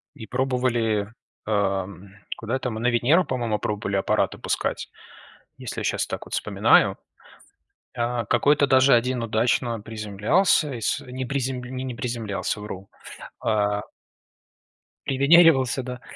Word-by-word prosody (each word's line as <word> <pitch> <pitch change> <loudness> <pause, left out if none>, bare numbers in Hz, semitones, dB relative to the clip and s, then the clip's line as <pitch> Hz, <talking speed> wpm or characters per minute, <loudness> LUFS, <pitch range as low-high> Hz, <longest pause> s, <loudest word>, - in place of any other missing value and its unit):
И 110 -6 -10
пробовали, 120 -5 0 0.3
эм, 100 -2 -1 0.3
куда 115 +3 -3
это 130 -1 -2
мы, 110 -2 -5
на 120 - 0
Венеру, 125 +9 +3
по-моему, 120 -5 -2
пробовали 105 -1 -3
аппараты 95 - 0
пускать. - - -2 0.7
Если - - -6
я - - -4
щас - - -1
так - - -6
вот - - -11
вспоминаю, - - +3 1.0
а, 120 0 -1
какой-то 145 +5 +3
даже 130 0 +5
один 125 +1 +1
удачно 115 +1 0
приземлялся, 110 - +1
и 115 - -6
сь - - 0
не 130 +1 -6
призем 130 -1 -2
не 130 0 -5
приземлялся, 115 -4 -3
вру, 100 -2 -8 0.5
а 105 -1 0 1.3
привенеривался, 140 -2 +4
да, 125 -1 -7
120 Hz, 125 wpm, -24 LUFS, 105-130 Hz, 1.3 s, даже